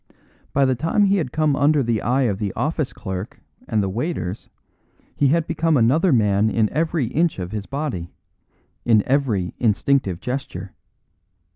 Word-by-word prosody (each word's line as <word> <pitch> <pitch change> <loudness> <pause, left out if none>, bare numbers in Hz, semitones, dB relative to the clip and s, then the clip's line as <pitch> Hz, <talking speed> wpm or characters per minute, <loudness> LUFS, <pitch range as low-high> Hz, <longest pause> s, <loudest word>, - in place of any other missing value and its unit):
By 140 0 +3
the 130 - +2
time 165 - +1
he 200 0 +3
had 155 -9 -2
come 155 -1 +1
under 145 0 +3
the 115 -2 0
eye 130 +4 +1
of 100 -6 0
the 100 -2 -2
office 155 -2 -1
clerk 95 0 -6 0.3
and 105 -2 +1
the - - -1
waiters 105 - -3 0.7
he 145 - +3
had 165 +3 +2
become 165 -2 +1
another 145 +10 +3
man 105 -3 +3
in 110 -1 +1
every 160 -3 0
inch 160 +7 0
of 90 -1 -5
his 105 -2 -5
body, 135 - -4 0.7
in 110 -3 +4
every 120 -10 0
instinctive 110 -4 +1
gesture. 110 -8 -5
125 Hz, 160 wpm, -22 LUFS, 105-150 Hz, 0.7 s, in